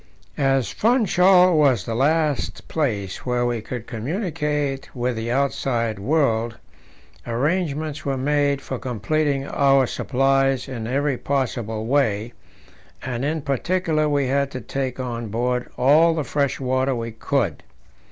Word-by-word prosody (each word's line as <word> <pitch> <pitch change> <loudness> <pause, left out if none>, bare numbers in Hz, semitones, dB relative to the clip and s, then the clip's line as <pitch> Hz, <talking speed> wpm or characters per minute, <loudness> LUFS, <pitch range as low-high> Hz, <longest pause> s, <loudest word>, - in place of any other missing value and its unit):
As 135 -2 +2
Funchal 185 -6 +4
was 135 -10 +3
the 115 - -3
last 150 +3 0
place 105 - -2
where 125 -1 0
we 120 -2 -1
could 120 +1 -6
communicate 150 - -2
with 125 0 -1
the 115 +1 -4
outside 120 -4 0
world, 115 -2 +1 0.7
arrangements 150 +4 -1
were 135 -1 -1
made 140 0 +1
for 130 - -5
completing 135 +4 -1
our 135 -2 +3
supplies 135 +1 +1
in 115 -4 -5
every 135 +1 0
possible 120 -5 -2
way, 115 -4 +1 0.7
and 125 -1 -3
in 155 +1 -1
particular 155 +2 0
we 145 -1 +1
had 140 +1 +1
to 130 -2 -6
take 130 +3 -4
on 120 -2 -4
board 125 +3 -1
all 155 +6 +5
the 155 - -1
fresh 140 +1 -1
water 130 0 0
we 115 -1 -4
could. 115 - -1
135 Hz, 130 wpm, -22 LUFS, 120-145 Hz, 0.7 s, all